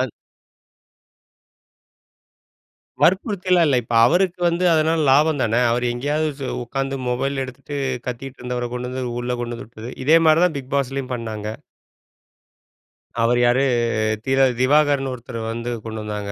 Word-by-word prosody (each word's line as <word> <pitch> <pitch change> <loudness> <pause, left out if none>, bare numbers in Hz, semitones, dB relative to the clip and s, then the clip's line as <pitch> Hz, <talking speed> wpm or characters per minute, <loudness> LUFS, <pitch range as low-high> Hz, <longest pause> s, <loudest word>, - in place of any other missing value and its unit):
An 130 -1 -1 2.9
வற்புறுத்தில்லாம் 185 -2 +3
இல்ல. 135 - +3
இப்ப 115 - -4
அவருக்கு 180 +3 +1
வந்து 170 +2 0
அதனால 160 +1 +2
லாபம் 150 +1 +3
தான. 110 -1 0 0.2
அவரு 120 +1 0
எங்கயாவது 145 +5 -1
சு 135 - -3 0.2
உட்கார்ந்து 135 +2 -3
மொபைல 135 +2 -1
எடுத்துட்டு, 140 +2 -8 0.3
கத்திட்டு 130 +2 -6
இருந்தவர 125 0 -3
கொண்டு 125 0 -4
வந்து 130 0 -4 0.2
உள்ள 125 +1 -2
கொண்டு 120 0 -4
வந்து - - -9
விட்டது. 115 +1 -9
இதே 155 +4 +6
மாரி 155 +1 +5
தான் 165 -5 0
பிக் 130 -1 -11
பாஸ்லயும் 135 -1 -2
பண்ணாங்க. 110 -3 -5 1.7
அவர் 120 +1 +3
யாரு? 125 +3 +3 0.6
திர 135 0 +1 0.2
திவாகர்னு 140 0 +3
ஒருத்தரு 120 -1 -7
வந்து 115 +1 -4
கொண்டு 110 -1 -6
வந்தாங்க. 105 -1 -5
130 Hz, 135 wpm, -21 LUFS, 120-150 Hz, 2.9 s, இதே